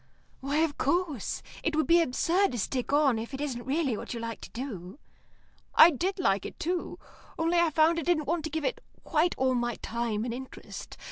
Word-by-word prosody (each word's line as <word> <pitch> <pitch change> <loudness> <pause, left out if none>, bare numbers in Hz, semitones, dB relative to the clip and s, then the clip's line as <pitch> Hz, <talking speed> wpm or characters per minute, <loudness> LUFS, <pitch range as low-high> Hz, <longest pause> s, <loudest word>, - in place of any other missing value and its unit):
"Why, 280 +3 -1
of 320 -3 0
course. 300 - -1 0.2
It 325 - -1
would 315 - +2
be 340 +1 +5
absurd 335 +5 +2
to - - -2
stick 250 +5 -2
on 285 -5 +3
if 235 +5 -5
it - - -7
isn't 250 -5 -3
really 275 -3 +1
what 225 - -6
you - - -4
like 230 0 -5
to - - -9
do." 225 -5 -7 0.8
"I 335 - +9
did 365 +7 -1
like 200 - +1
it, - - -8
too. 350 +1 -2 0.4
Only 335 +2 +2
I 340 -1 +4
found 320 +2 +3
I - - -2
didn't 330 -2 +1
want 330 +2 -1
to - - -2
give 315 -1 -3
it - - -1 0.2
quite 335 +2 +1
all 260 0 +2
my 240 -1 0
time 230 -1 -2
and 235 - -3
interest. 260 +2 -8
285 Hz, 210 wpm, -29 LUFS, 240-330 Hz, 0.8 s, I